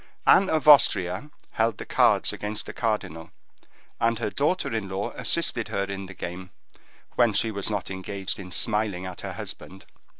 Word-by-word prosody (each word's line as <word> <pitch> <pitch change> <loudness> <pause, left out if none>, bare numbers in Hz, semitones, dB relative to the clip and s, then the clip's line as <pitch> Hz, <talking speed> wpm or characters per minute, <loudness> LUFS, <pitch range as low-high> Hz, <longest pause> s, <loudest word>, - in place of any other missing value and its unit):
Anne 195 - +6
of 155 -1 0
Austria 100 -5 +5 0.2
held 110 -1 0
the - - -7
cards - - +3
against 105 +1 -3
the - - -7
cardinal, 95 -8 -2 0.7
and 115 0 +2
her 110 -2 -2
daughter 150 -3 0
in 100 -3 -3
law 95 +1 -3
assisted - - 0
her 100 - -1
in 100 -1 -5
the 95 - -11
game, 90 +1 -6 0.7
when 120 -3 +4
she 110 +3 +1
was 100 -1 -2
not 105 -2 -3
engaged 95 +1 -4
in 90 -2 -9
smiling 105 -3 -1
at 90 -1 -7
her - - -5
husband. 95 +1 -9
100 Hz, 170 wpm, -26 LUFS, 95-115 Hz, 0.7 s, Anne